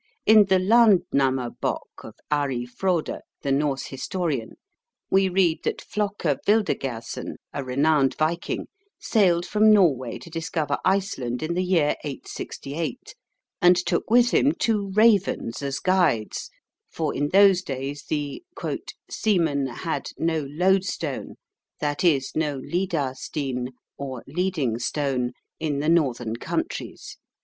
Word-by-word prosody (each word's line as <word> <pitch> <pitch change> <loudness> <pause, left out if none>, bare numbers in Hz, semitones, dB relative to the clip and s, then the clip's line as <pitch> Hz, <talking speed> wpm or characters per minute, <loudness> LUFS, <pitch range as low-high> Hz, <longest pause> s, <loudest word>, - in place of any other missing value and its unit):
In 215 -1 +7
the 190 -1 +3
Landnammabok 180 - +2
of - - -10 0.2
Ari 135 -5 0
Frode, 170 +6 -1 0.2
the 140 - 0
Norse 140 -1 0
historian, 140 -3 -3 0.6
we 190 0 +4
read 180 -3 +2
that - - -1
Flocke 205 -1 -3 0.2
Vildergersen, 135 - -1 0.2
a 140 - -3
renowned 140 +2 +2
viking, 160 +2 -1 0.3
sailed 175 -6 +2
from 215 +1 +4
Norway 145 - +3
to 170 - -13
discover 160 -3 -2
Iceland 155 -11 0
in 160 +2 -1
the 180 - 0
year 170 -5 +2
868, 150 - -6 0.5
and 180 0 +7
took 180 - -1
with 240 +1 +5
him 290 - +4
two 210 -8 0
ravens 200 - +2
as 140 -1 -2
guides, 175 - +1 0.4
for 160 -3 -2
in 145 +1 -1
those 195 0 +6
days 140 -2 -5
the 145 - -3 0.6
"seamen 160 -10 +1
had 130 +6 -4
no 160 -3 0
lodestone 180 -3 0 0.4
(that 145 +2 -1
is, 140 -6 +3
no 150 -3 -1
lidar 160 -2 -1
stein, 130 -2 -4 0.3
or 130 -3 -5
leading 150 -7 -1
stone) 130 -1 -1 0.3
in 155 -3 -1
the 150 +3 0
northern 125 -9 +1
countries." - - -4
155 Hz, 120 wpm, -24 LUFS, 135-185 Hz, 0.6 s, In